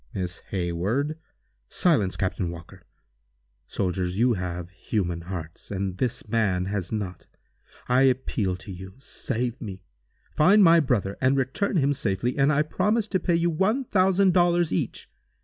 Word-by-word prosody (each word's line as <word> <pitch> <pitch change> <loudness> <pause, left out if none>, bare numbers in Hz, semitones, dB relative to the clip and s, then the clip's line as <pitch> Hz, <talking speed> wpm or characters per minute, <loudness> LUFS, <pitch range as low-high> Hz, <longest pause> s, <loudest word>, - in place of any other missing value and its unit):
"Miss 90 -2 -3
Hayward!" 100 - -1 0.5
"Silence, 110 - +2
Captain 95 -2 -1
Walker. 85 -1 -10 0.9
Soldiers, 90 -1 -2
you 120 +2 +3
have 90 -2 -4
human 90 -2 -2
hearts, 85 -2 -7
and 95 -2 -3
this 125 -2 -2
man 105 -5 +1
has 95 -2 -3
not. 100 -5 -4 0.6
I 125 +1 +3
appeal 125 -7 +1
to 95 +3 -10
you. 95 +1 -9
Save 125 -2 -4
me! 95 -5 -7 0.5
Find 195 +7 +6
my 170 -1 +7
brother 110 -9 0
and 130 +1 +3
return 135 +10 0
him 145 -2 +3
safely, 120 -3 -1
and 140 +1 +3
I 150 +1 +3
promise 210 +8 0
to 190 - +1
pay 175 0 +1
you 170 +1 +2
one 210 - +1
thousand 190 -3 +3
dollars 175 -2 +3
each. - - -2
115 Hz, 150 wpm, -25 LUFS, 95-155 Hz, 0.9 s, my